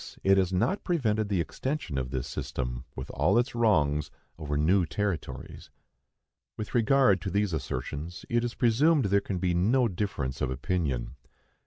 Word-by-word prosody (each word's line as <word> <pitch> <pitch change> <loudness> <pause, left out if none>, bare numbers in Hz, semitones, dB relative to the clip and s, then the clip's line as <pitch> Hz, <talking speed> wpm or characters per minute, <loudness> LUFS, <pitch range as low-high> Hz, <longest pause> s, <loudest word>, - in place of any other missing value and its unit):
It 95 0 +5
has 95 -1 +1
not 165 - 0
prevented 110 - 0
the 100 -3 +1
extension 130 - -3
of 65 -1 -3
this 65 -2 -3
system, 60 -1 -4
with 65 - -6
all - - +2
its 120 +2 +1
wrongs, 75 -11 +2 0.3
over 75 -2 -2
new 90 +6 +3
territories. 100 +1 -4 0.9
With 105 - -6
regard 120 -5 +4
to 95 - -3
these 100 -1 0
assertions 75 +4 -4
it 120 0 +1
is 120 -1 -3
presumed 135 +4 +3
there 100 0 +3
can 100 -1 -3
be 90 0 0
no 115 +9 +3
difference 85 - -3
of 65 - +1
opinion. 70 -2 -2
95 Hz, 160 wpm, -28 LUFS, 75-115 Hz, 0.9 s, It